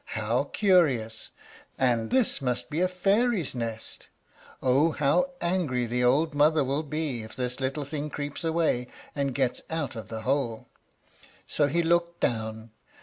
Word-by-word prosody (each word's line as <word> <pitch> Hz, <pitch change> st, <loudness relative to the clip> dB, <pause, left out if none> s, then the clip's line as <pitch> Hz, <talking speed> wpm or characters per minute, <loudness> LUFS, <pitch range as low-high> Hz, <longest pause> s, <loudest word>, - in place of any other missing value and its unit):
"How 115 Hz, +5 st, +1 dB
curious! 140 Hz, -, +2 dB, 0.5 s
and 120 Hz, -4 st, +1 dB
this 255 Hz, -, +2 dB
must 125 Hz, -2 st, -2 dB
be 155 Hz, +4 st, 0 dB
a 185 Hz, -, +4 dB
fairy's 195 Hz, -, +1 dB
nest. 115 Hz, -3 st, -5 dB, 0.5 s
Oh, 135 Hz, +5 st, +3 dB
how 150 Hz, -, +2 dB
angry 170 Hz, -9 st, 0 dB
the 125 Hz, +2 st, -1 dB
old 145 Hz, +6 st, +3 dB
mother 150 Hz, +1 st, +4 dB
will 135 Hz, +3 st, 0 dB
be 150 Hz, -5 st, -3 dB
if 110 Hz, -, -9 dB
this 125 Hz, 0 st, -2 dB
little 135 Hz, +2 st, -2 dB
thing 150 Hz, +1 st, -4 dB
creeps 145 Hz, +2 st, -5 dB
away 160 Hz, -7 st, +1 dB, 0.3 s
and 140 Hz, -3 st, -1 dB
gets 130 Hz, -3 st, 0 dB
out 160 Hz, -6 st, -2 dB
of 110 Hz, -4 st, -7 dB
the 110 Hz, -1 st, -6 dB
hole!" 125 Hz, -3 st, -1 dB, 0.8 s
So 145 Hz, -, +2 dB
he 170 Hz, +4 st, +1 dB
looked 170 Hz, +1 st, +1 dB
down. 110 Hz, -1 st, -2 dB
140 Hz, 150 wpm, -27 LUFS, 125-160 Hz, 0.8 s, a